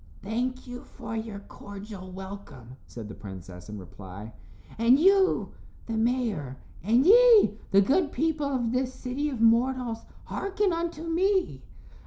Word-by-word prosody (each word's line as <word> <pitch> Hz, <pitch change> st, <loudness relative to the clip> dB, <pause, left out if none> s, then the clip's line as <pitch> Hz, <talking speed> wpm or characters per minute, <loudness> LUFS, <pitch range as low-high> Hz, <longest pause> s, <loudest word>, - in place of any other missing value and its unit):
"Thank 250 Hz, +5 st, -3 dB
you 245 Hz, +1 st, -8 dB
for 225 Hz, -, -8 dB
your 220 Hz, -2 st, -5 dB
cordial 200 Hz, -2 st, -10 dB
welcome," 190 Hz, -, -10 dB
said 115 Hz, -3 st, -8 dB
the 105 Hz, -, -8 dB
princess, 95 Hz, -3 st, -10 dB
in 105 Hz, -, -6 dB
reply, 100 Hz, +3 st, -10 dB, 0.5 s
"and 240 Hz, +4 st, +5 dB
you 385 Hz, +2 st, +3 dB, 0.3 s
the 230 Hz, -, -5 dB
mayor, 220 Hz, -, -1 dB, 0.2 s
and 235 Hz, -, +3 dB
ye 435 Hz, -, +6 dB
the 195 Hz, -, +5 dB
good 285 Hz, -, +2 dB
people 310 Hz, +1 st, 0 dB
of 250 Hz, -4 st, -1 dB
this 255 Hz, +1 st, -1 dB
city 270 Hz, +4 st, -3 dB
of 260 Hz, -5 st, -5 dB
mortals, 235 Hz, 0 st, +2 dB, 0.2 s
hearken 395 Hz, -1 st, -1 dB
unto 335 Hz, -1 st, -3 dB
me. 370 Hz, +3 st, 0 dB
235 Hz, 140 wpm, -27 LUFS, 195-295 Hz, 0.5 s, ye